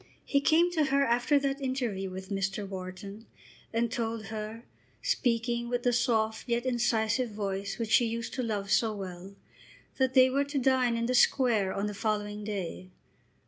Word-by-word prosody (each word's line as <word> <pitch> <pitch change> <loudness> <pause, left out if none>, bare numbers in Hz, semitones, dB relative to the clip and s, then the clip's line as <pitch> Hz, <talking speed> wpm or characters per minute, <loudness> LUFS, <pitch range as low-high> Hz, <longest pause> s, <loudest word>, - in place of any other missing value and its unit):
He 280 - +2
came 335 +4 +4
to 315 -4 +2
her 275 0 +2
after 245 +5 +3
that 275 0 -1
interview 240 -8 -2
with 190 +1 -8
Mr. 195 +1 -2
Wharton 195 +3 -8 0.4
and 230 0 0
told 225 -2 -3
her, 215 +2 -5 0.4
speaking 235 - 0
with 245 0 -1
the 245 - +2
soft 220 -1 0
yet 235 +1 0
incisive 240 -1 +1
voice 200 -2 -3
which 225 -2 -3
she 235 +2 +5
used 230 +1 -4
to 255 - -2
love 205 -4 -3
so 220 -2 +2
well, 190 0 -8 0.6
that 260 0 +1
they 255 0 +8
were 280 +2 +2
to 285 0 -4
dine 255 -2 +2
in 230 - -1
the 250 - 0
Square 240 -6 +3
on 200 - -1
the 210 - -3
following 210 0 -2
day. 190 -3 -5
230 Hz, 175 wpm, -29 LUFS, 205-255 Hz, 0.6 s, they